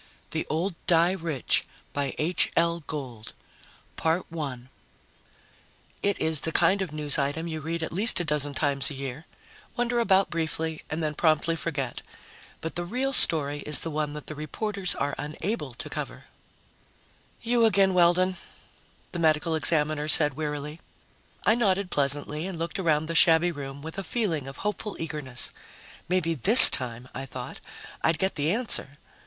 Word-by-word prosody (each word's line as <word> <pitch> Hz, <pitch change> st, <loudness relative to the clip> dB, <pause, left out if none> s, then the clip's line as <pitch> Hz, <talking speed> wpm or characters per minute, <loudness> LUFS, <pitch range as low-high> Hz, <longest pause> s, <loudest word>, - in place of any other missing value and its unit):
THE -, -, -3 dB
OLD 170 Hz, +5 st, -2 dB
DIE 170 Hz, 0 st, +3 dB
RICH 165 Hz, -8 st, -1 dB, 0.3 s
By 140 Hz, -2 st, -3 dB
H. 170 Hz, +4 st, 0 dB
L. 170 Hz, 0 st, +1 dB
GOLD 125 Hz, -8 st, -8 dB, 0.7 s
Illustrated 165 Hz, +3 st, +1 dB
by 165 Hz, -, -9 dB
ASHMAN 130 Hz, -3 st, -7 dB, 1.3 s
_It 200 Hz, -1 st, 0 dB
is 160 Hz, -2 st, -1 dB
the 160 Hz, -, -3 dB
kind 185 Hz, +5 st, +2 dB
of 185 Hz, -5 st, -4 dB
news 150 Hz, -1 st, +2 dB
item 145 Hz, +4 st, -2 dB
you 160 Hz, -1 st, -5 dB
read 165 Hz, +2 st, -4 dB
at -, -, -5 dB
least 205 Hz, +5 st, +5 dB
a -, -, -1 dB
dozen 145 Hz, -2 st, -1 dB
times 140 Hz, -2 st, 0 dB
a 145 Hz, -, -8 dB
year, 135 Hz, +3 st, -7 dB, 0.5 s
wonder 240 Hz, 0 st, 0 dB
about 195 Hz, -4 st, +2 dB
briefly, 160 Hz, -1 st, -3 dB
and 160 Hz, +2 st, -4 dB
then 155 Hz, -1 st, -2 dB
promptly 155 Hz, +1 st, +1 dB
forget 145 Hz, -6 st, -5 dB, 0.6 s
but 160 Hz, -, -5 dB
the 175 Hz, -, -3 dB
real 255 Hz, +9 st, -2 dB
story 145 Hz, -, +4 dB
is 150 Hz, 0 st, -3 dB
the 165 Hz, -, -4 dB
one 150 Hz, -1 st, -3 dB
that 150 Hz, -1 st, -9 dB
the -, -, -7 dB
reporters 185 Hz, +5 st, -3 dB
are 145 Hz, 0 st, -3 dB
unable 150 Hz, -, -5 dB
to -, -, -8 dB
cover!_ -, -, -7 dB, 1.2 s
"You 235 Hz, 0 st, +2 dB
again, 195 Hz, -3 st, +3 dB
Weldon," 180 Hz, +1 st, +2 dB, 0.7 s
the 175 Hz, -, -5 dB
Medical 160 Hz, 0 st, +1 dB
Examiner 155 Hz, -1 st, +2 dB
said 150 Hz, -2 st, +4 dB
wearily. 150 Hz, +1 st, -6 dB, 0.7 s
I 215 Hz, -, +4 dB
nodded 200 Hz, -5 st, 0 dB
pleasantly 145 Hz, +3 st, 0 dB
and 190 Hz, -3 st, -7 dB
looked 165 Hz, +3 st, -5 dB
around 160 Hz, -4 st, 0 dB
the 165 Hz, -, -5 dB
shabby 165 Hz, +1 st, +4 dB
room 140 Hz, -2 st, -9 dB
with 160 Hz, +4 st, -7 dB
a -, -, -5 dB
feeling 175 Hz, -, -3 dB
of 135 Hz, -, -9 dB
hopeful 210 Hz, 0 st, -4 dB
eagerness. 150 Hz, -6 st, -3 dB, 0.6 s
Maybe 180 Hz, -2 st, 0 dB
this 200 Hz, -, +11 dB
time, 120 Hz, -1 st, -3 dB
I 135 Hz, +1 st, -7 dB
thought, 125 Hz, -1 st, -8 dB, 0.4 s
I'd 160 Hz, 0 st, +1 dB
get 190 Hz, +4 st, 0 dB
the 150 Hz, +2 st, -1 dB
answer. 205 Hz, -, 0 dB
160 Hz, 165 wpm, -25 LUFS, 145-180 Hz, 1.3 s, this